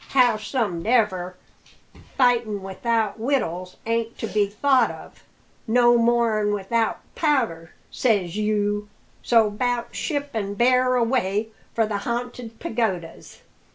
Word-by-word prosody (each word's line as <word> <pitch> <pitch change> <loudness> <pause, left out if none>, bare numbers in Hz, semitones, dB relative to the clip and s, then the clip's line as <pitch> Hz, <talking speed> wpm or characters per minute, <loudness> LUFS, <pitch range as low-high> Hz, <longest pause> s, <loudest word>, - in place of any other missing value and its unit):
"Howsomedever, 215 -5 +1 0.8
fightin' 235 -6 +2
without 220 +3 -1
wittles 185 - -1
ain't 230 0 -1
to - - -4
be 210 -2 +1
thought 255 +4 +2
of, - - -11 0.4
no 240 +1 +5
more'n 230 -3 +2
without 220 +3 -1
powder, 230 - 0 0.2
says 200 -8 0
you; 210 -1 0 0.3
so 225 -3 +3
'bout 240 +2 -2
ship 285 -2 -2
an' 200 -2 -3
bear 255 +2 +3
away 225 -4 0 0.3
for 225 - +3
the 210 -1 -2
Ha'nted 240 +1 -5
Pagodas!" 190 -10 -4
225 Hz, 110 wpm, -23 LUFS, 205-245 Hz, 0.8 s, no